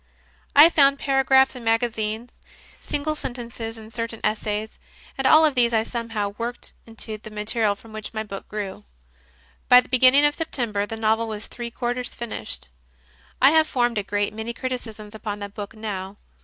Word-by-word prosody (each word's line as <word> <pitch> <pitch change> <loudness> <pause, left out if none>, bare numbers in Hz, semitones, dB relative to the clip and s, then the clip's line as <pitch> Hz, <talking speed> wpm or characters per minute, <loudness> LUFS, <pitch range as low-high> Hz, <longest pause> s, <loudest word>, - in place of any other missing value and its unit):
I 295 +3 +10
found 280 -3 +5
paragraphs 270 -1 +3
in 250 - -8
magazines, 225 0 -1 0.5
single 300 +2 -2
sentences 235 -4 -6
in 220 0 -12
certain 230 0 -4
essays, 215 0 -2 0.4
and 270 0 +1
all 315 +3 +7
of 300 - +2
these 240 -2 +3
I 220 -1 +3
somehow 225 -3 -3
worked 240 +1 -5
into 225 -1 -4
the 215 - -10
material 210 0 0
from 220 +2 -16
which 215 -1 -6
my 220 -1 -3
book 200 -2 -8
grew. 205 -3 -5 0.9
By 250 - +10
the - - -5
beginning 260 +3 +6
of 295 - +3
September 235 -10 -2
the 225 - -6
novel 220 +1 +1
was 215 -1 -5
three 240 -1 -6
quarters 245 +1 -3
finished. 105 - -7 0.7
I 270 +2 +7
have 315 0 +4
formed 240 -6 +1
a - - -3
great 205 +1 -1
many 220 +2 -4
criticisms 230 -4 -6
upon 210 -1 -5
that 200 -1 -7
book 205 +1 -7
now. 200 -2 -5
225 Hz, 170 wpm, -24 LUFS, 215-250 Hz, 0.9 s, I